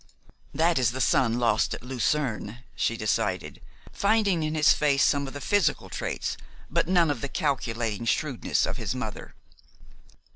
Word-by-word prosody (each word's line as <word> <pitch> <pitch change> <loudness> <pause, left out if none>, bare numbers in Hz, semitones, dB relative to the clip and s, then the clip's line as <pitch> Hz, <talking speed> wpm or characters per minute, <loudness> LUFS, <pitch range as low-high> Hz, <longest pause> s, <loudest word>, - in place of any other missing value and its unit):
"That 165 -1 +2
is 120 -2 +2
the 130 - -4
son 125 -3 +2
lost 115 -3 +1
at - - -12
Lucerne," 125 -2 -2
she 115 - 0
decided, 110 -2 -2 0.3
finding 200 -4 +2
in 155 0 -2
his 155 -1 +5
face 140 -2 +2
some 140 -1 +2
of 135 - -8
the 145 - -6
physical 165 0 +1
traits - - -3 0.3
but - - +1
none 175 -4 +3
of 145 - -4
the 140 - -3
calculating 115 - -2
shrewdness 140 0 0
of - - -3
his - - -3
mother. - - -6
140 Hz, 155 wpm, -26 LUFS, 120-155 Hz, 0.3 s, his